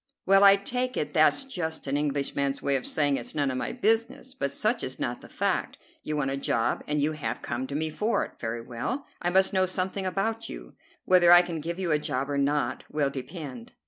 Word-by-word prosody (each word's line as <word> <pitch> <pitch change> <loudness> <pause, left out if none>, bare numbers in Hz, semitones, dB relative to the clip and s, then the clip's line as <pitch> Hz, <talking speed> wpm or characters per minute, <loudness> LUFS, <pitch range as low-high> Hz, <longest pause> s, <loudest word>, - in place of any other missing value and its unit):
"Well, 195 +1 +6
I 200 0 +9
take 250 +5 -2
it - - -2
that's 280 - +4
just 175 -12 -4
an 140 0 -1
Englishman's 140 -1 -1
way 140 - 0
of 130 - -2
saying 145 -2 +1
it's - - -5
none 145 -3 +1
of 130 - -3
my - - -2
business; 230 +2 0
but 265 - -2
such 230 +2 0
is 130 - -4
not 120 - -3
the - - -13
fact. - - -1 0.2
You 155 0 -3
want 135 -2 0
a 135 - -1
job, 115 -4 0
and 150 0 0
you 150 +2 +1
have 155 -2 -4
come 125 +2 -3
to 140 - -5
me 155 +1 -1
for 215 +8 0
it. - - -16
Very 115 0 -3
well; 125 - -4 0.2
I 175 - +1
must 190 +2 +3
know 185 -1 +3
something 185 +1 -2
about 220 +5 -2
you. - - -9 0.3
Whether 180 -2 +6
I 175 0 +9
can 170 -3 -5
give 170 +3 -4
you 185 -3 -1
a 150 - +3
job 140 -2 -2
or 140 - 0
not 145 +1 0
will 145 -2 0
depend. 135 -3 -8
155 Hz, 230 wpm, -27 LUFS, 140-195 Hz, 0.3 s, I